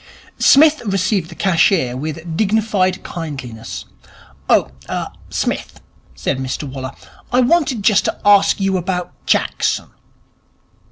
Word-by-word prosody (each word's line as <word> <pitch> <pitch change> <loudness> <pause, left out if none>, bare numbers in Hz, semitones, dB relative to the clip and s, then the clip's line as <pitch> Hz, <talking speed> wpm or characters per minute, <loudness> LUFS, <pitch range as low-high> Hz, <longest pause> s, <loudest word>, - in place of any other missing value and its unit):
Psmith 305 +2 +6
received 195 -4 0
the 170 - -10
cashier 170 -8 +2
with 150 +4 -4
a 160 - -12
dignified 195 +1 0
kindliness. 135 -9 -7 0.6
'Oh, - - +3 0.2
er, - - -3 0.2
Smith,' - - -3 0.4
said 135 - -2
Mr 130 +2 -3
Waller, 130 -1 -6 0.4
'I 250 +1 +4
wanted 260 -5 +2
just 210 -2 +4
to - - -2
ask 205 -1 +5
you 195 -1 +1
about 180 0 -3
Jackson.' - - 0
185 Hz, 120 wpm, -18 LUFS, 150-210 Hz, 0.6 s, Psmith